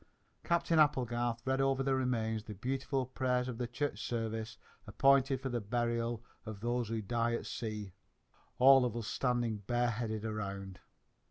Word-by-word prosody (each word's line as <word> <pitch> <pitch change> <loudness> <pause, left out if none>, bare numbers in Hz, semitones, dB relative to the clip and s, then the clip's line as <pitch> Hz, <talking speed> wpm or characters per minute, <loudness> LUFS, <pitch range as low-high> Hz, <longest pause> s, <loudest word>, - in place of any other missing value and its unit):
Captain 170 -1 +2
Applegarth 120 -5 +2
read 130 0 +1
over 135 0 +2
the 135 0 +1
remains 115 -4 0
the 105 -3 -7
beautiful 130 +4 -1
prayers 125 -1 0
of 125 -2 -5
the 120 - -1
Church 135 +5 -3
Service 110 -2 -3 0.3
appointed 135 -1 +4
for 135 0 -4
the 120 -2 -2
burial 115 +1 -1 0.2
of 110 -3 -7
those 120 0 -1
who 115 -1 -2
die 115 +2 0
at - - -4
sea, 105 -4 -5 0.6
all 135 +1 +8
of 120 -2 -1
us 115 - -4
standing 120 -2 0
bareheaded 115 0 -1
around. 100 -3 -4
120 Hz, 155 wpm, -33 LUFS, 110-130 Hz, 0.6 s, all